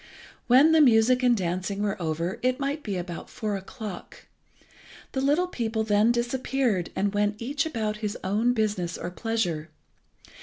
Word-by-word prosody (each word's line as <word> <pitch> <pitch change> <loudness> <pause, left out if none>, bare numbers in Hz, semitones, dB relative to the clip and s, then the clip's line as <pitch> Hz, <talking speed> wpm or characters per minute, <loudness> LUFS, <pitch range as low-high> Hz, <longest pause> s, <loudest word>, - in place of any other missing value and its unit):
When 265 +6 +6
the 320 -1 +6
music 250 -1 +5
and 245 -2 +4
dancing 190 +2 -2
were 200 -3 -2
over 170 +6 -2
it 255 +2 +1
might 285 +2 -2
be 200 -7 -3
about 175 -2 -6
four 210 -2 -3
o'clock. 195 0 -8 0.9
The 265 - -2
little 295 +6 +2
people 225 -9 -2
then 215 +1 +3
disappeared, 240 -4 0
and 200 +1 0
went 205 0 0
each 280 +5 -1
about 220 -7 -2
his 210 -1 -3
own 215 +6 +1
business 205 -6 -1
or 175 - -5
pleasure. 180 -7 -2
220 Hz, 155 wpm, -26 LUFS, 195-250 Hz, 0.9 s, When